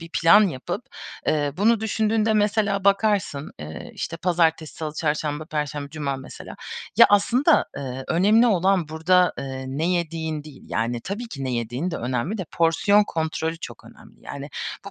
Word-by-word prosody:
bir 165 - -9
plan 190 +5 +5
yapıp, 175 - -5 0.4
eee, 145 -2 +1
bunu 220 +3 +3
düşündüğünde 220 0 +1
mesela 205 -2 +1
bakarsın, 200 -8 +1
eee, 75 +1 -8
işte, 165 - -4
pazartesi, 165 -2 +1
salı, 155 -2 -5
çarşamba, 150 -1 -1
perşembe, 150 -2 -4
cuma 145 -3 -3
mesela. 130 0 -10 0.4
Ya, - - +9
aslında, 250 - +4
ııı, 130 -1 -5
önemli 210 +7 +4
olan 190 -4 +2
burada, 180 +3 +3
ııı, 130 -1 -5
ne 160 - +1
yediğin 160 -3 -2
değil. 150 -3 -13
Yani 115 +1 -2
tabii 210 - -5
ki 140 -9 -6
ne 130 - -2
yediğin 120 +8 -2
de 165 - -3
önemli 125 - -2
de 185 - -3
porsiyon 170 +6 +3
kontrolü 160 -2 -2
çok - - -9
önemli. - - -17
Yani 140 +1 -7 0.3
bu 200 - -8
165 Hz, 160 wpm, -23 LUFS, 145-200 Hz, 0.4 s, Ya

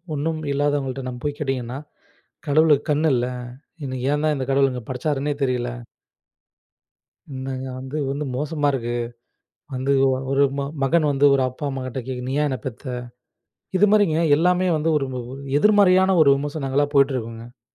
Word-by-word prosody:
ஒண்ணும் 155 +2 -2
இல்லாதவங்கள்ட 140 -2 -1
நம்ம 125 -1 -6
போய்க் 145 0 -3
கேட்டிங்கன்னா 135 -2 -3 0.7
"கடவுளுக்கு 150 0 +3
கண்ணு 150 +2 +2
இல்ல, 120 0 +1 0.6
என்னை 130 -1 -4
ஏந்தா 150 +1 +1
இந்தக் 130 0 -3
கடவுள் 135 0 +3
இங்க 125 -3 -6
படைச்சாருன்னே 145 +2 -1
தெரில". 125 -2 -1 1.6
இன்னாங்க 130 0 -5
வந்து 135 +3 -6
வந்து 145 +2 -3
மோசமா 150 +1 -1
இருக்கு, 120 -3 -2 0.8
வந்து 130 +2 0
ஒ - - +4 0.2
ஒரு 135 +1 +3
ம 140 - -1 0.2
மகன் 155 +4 +3
வந்து 140 0 +1
ஒரு 135 - +2
அப்பா, 145 +4 -8
அம்மாகிட்ட 130 -1 -5
கேக்குது 125 -1 -5
"நீ - - -2
ஏன் 150 - +2
என்ன 130 - -2
பெத்த?" 130 +1 -7 0.9
இது 205 +3 +5
மாரிங்க 200 -7 +4 0.2
எல்லாமே 180 +3 +2
வந்து 155 +2 -1
ஒரும்ப 135 -3 -2
ஒரு 135 +1 -8 0.2
எதிர்மறையான 190 0 +5
ஒரு 150 - +6
விமர்சனங்களா 145 0 -1
போட்டு 140 0 +4
இருக்குங்க.அதே 115 +1 -7
140 Hz, 150 wpm, -22 LUFS, 130-150 Hz, 1.6 s, ஒரு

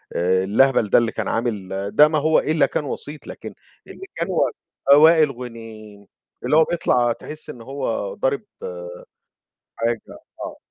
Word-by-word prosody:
آآ، 95 +2 +2
اللهبل 110 +2 +3
ده - - +5
اللي 115 -1 +2
كان 110 -3 -4
عامل 110 -5 -2 0.3
ده 150 +1 +8
ما 155 0 0
هو 155 +2 +3
إلّا 155 +1 +2
كان 150 - -3
وسيط، 145 +2 -7
لكن - - -8 0.3
اللي 385 - -10
كان - - -2
هو - - +1 0.4
آه، 140 - +9
وائل 155 -1 +6
غُنيم 115 -4 -10 0.4
اللي 150 - +3
هو 160 - +7
بيطلع 125 -8 +1
تحس 150 +6 -8
إن 120 - -9
هو 140 - -3
ضارب - - 0 1.4
حاجة، 115 -1 -1 0.4
آه. - - -7
125 Hz, 155 wpm, -21 LUFS, 115-155 Hz, 1.4 s, آه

